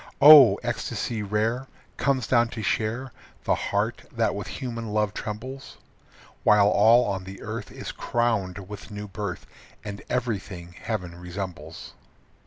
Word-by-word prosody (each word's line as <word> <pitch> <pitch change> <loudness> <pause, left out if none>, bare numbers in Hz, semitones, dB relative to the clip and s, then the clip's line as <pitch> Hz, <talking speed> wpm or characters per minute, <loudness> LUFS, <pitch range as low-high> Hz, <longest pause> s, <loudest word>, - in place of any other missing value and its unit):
Oh! 145 -4 +10
ecstasy 115 -2 -3
rare 110 +5 -1 0.3
Comes 135 -3 +1
down 120 -1 +3
to 110 - -3
share 115 +5 -1 0.3
The - - +2
heart - - -1
that - - 0
with - - -5
human 115 -3 -5
love 105 -1 0
trembles; 130 +7 -7 0.7
While 105 -1 +5
all 115 +4 +5
on 95 -2 -2
the 95 +1 -10
earth - - -6
Is - - -7
crowned 100 -6 -1
with 105 +1 -9
new 105 0 -7
birth 100 -2 -5 0.4
And 100 -1 -6
everything 100 -8 -3
heaven 90 -3 -4
resembles. 90 0 -7
105 Hz, 135 wpm, -25 LUFS, 100-120 Hz, 0.7 s, Oh